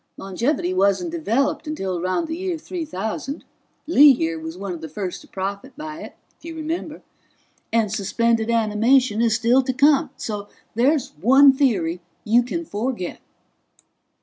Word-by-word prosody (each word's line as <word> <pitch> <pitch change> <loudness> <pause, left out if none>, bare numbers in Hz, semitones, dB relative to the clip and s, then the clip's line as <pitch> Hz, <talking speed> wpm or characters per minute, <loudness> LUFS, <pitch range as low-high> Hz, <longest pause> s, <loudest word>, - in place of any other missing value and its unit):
Longevity 195 - -1
wasn't 200 - +1
developed 285 -1 -1
until 195 -12 -3
around 185 - -1
the 320 - -3
year 365 -1 -3
3000 280 - -5 0.4
Lee 295 -3 +7
here 165 -7 -2
was 160 +2 -7
one 195 -1 -5
of 165 - -8
the 160 - -7
first 185 +3 -5
to - - -17
profit 200 +8 -5
by 310 +1 -7
it, - - -10 0.2
if - - -32
you 330 0 -7
remember 320 0 -5 0.7
and 225 -3 +1
suspended 225 +3 0
animation 230 +1 +2
is 230 -2 +3
still 240 +3 +3
to 260 0 -2
come. 285 +3 +4
So 205 -2 -5 0.3
there's 265 +5 +2
one 270 +6 +7
theory 185 - 0 0.2
you 230 +3 +4
can 330 +8 -4
forget." 220 - -4
235 Hz, 150 wpm, -22 LUFS, 200-295 Hz, 0.7 s, Lee